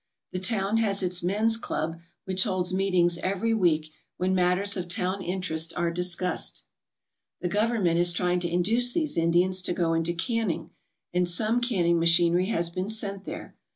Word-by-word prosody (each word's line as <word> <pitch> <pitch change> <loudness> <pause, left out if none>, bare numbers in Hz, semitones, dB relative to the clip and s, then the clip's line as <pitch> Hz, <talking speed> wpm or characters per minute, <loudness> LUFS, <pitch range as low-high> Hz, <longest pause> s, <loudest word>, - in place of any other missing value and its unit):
The 185 - -3
town 200 +1 +1
has 200 -3 +2
its 180 -1 0
men's 215 +5 +1
club, 165 -6 -3 0.3
which 190 0 +2
holds 185 -3 0
meetings 180 -3 +2
every 195 +5 -1
week, 160 -7 +1 0.3
when 185 +1 0
matters 185 +2 +2
of 180 -2 -4
town 185 +2 -2
interest 170 -3 -3
are 170 -1 0
discussed. 180 +1 -2 0.8
The 180 - -1
Government 205 -4 +1
is 175 0 +4
trying 180 +1 0
to 175 -1 -3
induce 225 +8 +2
these 310 -3 0
Indians 175 +3 +2
to 180 - 0
go 170 -2 0
into 165 +1 0
canning 225 0 -2 0.4
and 180 0 +1
some 220 +6 +1
canning 175 -8 +1
machinery 170 +2 +3
has 170 -5 0
been 185 +3 -4
sent 200 -3 -2
there. - - -8
180 Hz, 165 wpm, -26 LUFS, 175-200 Hz, 0.8 s, is